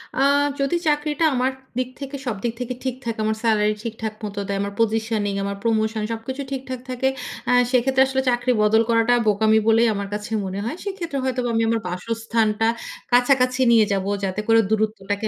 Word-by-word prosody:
আ -, -, -2 dB, 0.4 s
যদি 275 Hz, +4 st, +1 dB
চাকরিটা 295 Hz, +1 st, +1 dB
আমার 255 Hz, +2 st, +1 dB, 0.3 s
দিক 255 Hz, 0 st, -1 dB
থেকে 275 Hz, 0 st, -6 dB
সব 240 Hz, -5 st, -1 dB
দিক 235 Hz, -1 st, -1 dB
থেকে 250 Hz, 0 st, -3 dB
ঠিক 260 Hz, -2 st, -2 dB
থাকে, 230 Hz, -1 st, -3 dB
আমার 220 Hz, 0 st, 0 dB
সেলারি 215 Hz, -2 st, +3 dB
ঠিকঠাক 225 Hz, -2 st, -4 dB
মত 205 Hz, -1 st, -5 dB
দেয়। 200 Hz, 0 st, -1 dB
আমার 200 Hz, 0 st, -3 dB
পজিশনিং 220 Hz, -2 st, 0 dB
আমার 200 Hz, 0 st, -3 dB
প্রমোশন 220 Hz, -1 st, 0 dB
সবকিছু 230 Hz, +5 st, -5 dB
ঠিকঠাক 260 Hz, -1 st, -4 dB
থাকে। 255 Hz, +1 st, 0 dB, 0.4 s
আ -, -, +4 dB, 0.2 s
সেক্ষেত্রে 260 Hz, +1 st, +3 dB
আসলে 265 Hz, 0 st, 0 dB
চাকরি 245 Hz, +1 st, +1 dB
বদল 220 Hz, +1 st, +4 dB
করাটা 230 Hz, +1 st, +3 dB
বোকামি 220 Hz, +1 st, +4 dB
বলেই 225 Hz, +1 st, +5 dB
আমার 200 Hz, 0 st, -3 dB
কাছে 210 Hz, +2 st, -5 dB
মনে 190 Hz, +1 st, -4 dB
হয়। 265 Hz, -, -3 dB
সেক্ষেত্রে 350 Hz, -8 st, -4 dB
হয়তো 260 Hz, -1 st, -1 dB
আমি 225 Hz, -, +2 dB
আমার 230 Hz, 0 st, +1 dB
বাসস্থানটা 225 Hz, +3 st, 0 dB, 0.4 s
কাছাকাছি 255 Hz, +1 st, +3 dB
নিয়ে 225 Hz, -2 st, +6 dB
যাব। 195 Hz, -1 st, -1 dB, 0.2 s
যাতে 195 Hz, +2 st, -1 dB
করে 225 Hz, 0 st, +5 dB
দূরত্বটাকে 215 Hz, -1 st, -1 dB
225 Hz, 180 wpm, -22 LUFS, 215-255 Hz, 0.4 s, নিয়ে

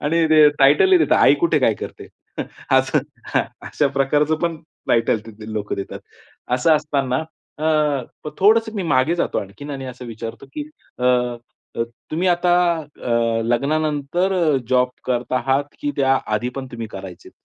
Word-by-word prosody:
आणि 165 Hz, +3 st, +1 dB
ते 155 Hz, -1 st, +7 dB
टायटलही 150 Hz, -, +6 dB
देतात, -, -, +3 dB
आई -, -, +6 dB
कुठे 340 Hz, -, +2 dB
काय -, -, +3 dB
करते? -, -, -9 dB, 0.6 s
असं -, -, +3 dB, 0.4 s
हां, -, -, +4 dB, 0.3 s
अशा 145 Hz, -, +1 dB
प्रकारचं 145 Hz, +3 st, +2 dB
पण 170 Hz, -1 st, 0 dB, 0.3 s
टायटल 115 Hz, -1 st, +2 dB
तिथे 110 Hz, 0 st, -10 dB
लोकं 105 Hz, -2 st, -3 dB
देतात. 100 Hz, -, -6 dB, 0.5 s
असं 155 Hz, +5 st, +4 dB
असताना 145 Hz, -1 st, -1 dB, 0.3 s
अ, 155 Hz, -, -4 dB, 0.6 s
तर 150 Hz, -, -3 dB
थोडंसं 220 Hz, +3 st, +4 dB
मी 200 Hz, -, -2 dB
मागे 155 Hz, 0 st, +2 dB
जातो 175 Hz, -, -1 dB
आणखीन 100 Hz, +10 st, -8 dB
आणि 135 Hz, -2 st, -5 dB
असं 125 Hz, 0 st, -8 dB
विचारतो 115 Hz, +3 st, -7 dB
की 295 Hz, 0 st, -5 dB, 0.3 s
अ, 125 Hz, -, -3 dB
अ, 125 Hz, -1 st, +2 dB, 0.7 s
तुम्ही 175 Hz, +4 st, 0 dB
आता 175 Hz, 0 st, +2 dB, 0.5 s
अ, 115 Hz, -1 st, +1 dB
लग्नानंतर 150 Hz, +8 st, 0 dB, 0.3 s
जॉब 125 Hz, 0 st, +3 dB, 0.2 s
करत 125 Hz, -1 st, -2 dB
आहात 135 Hz, +2 st, +1 dB, 0.2 s
की 290 Hz, 0 st, -1 dB
त्या 135 Hz, -1 st, +3 dB
आधी 110 Hz, +3 st, -1 dB
पण 135 Hz, -1 st, -4 dB
तुम्ही 115 Hz, -1 st, -5 dB
करायचेत? 95 Hz, -2 st, -9 dB
135 Hz, 155 wpm, -21 LUFS, 120-160 Hz, 0.7 s, ते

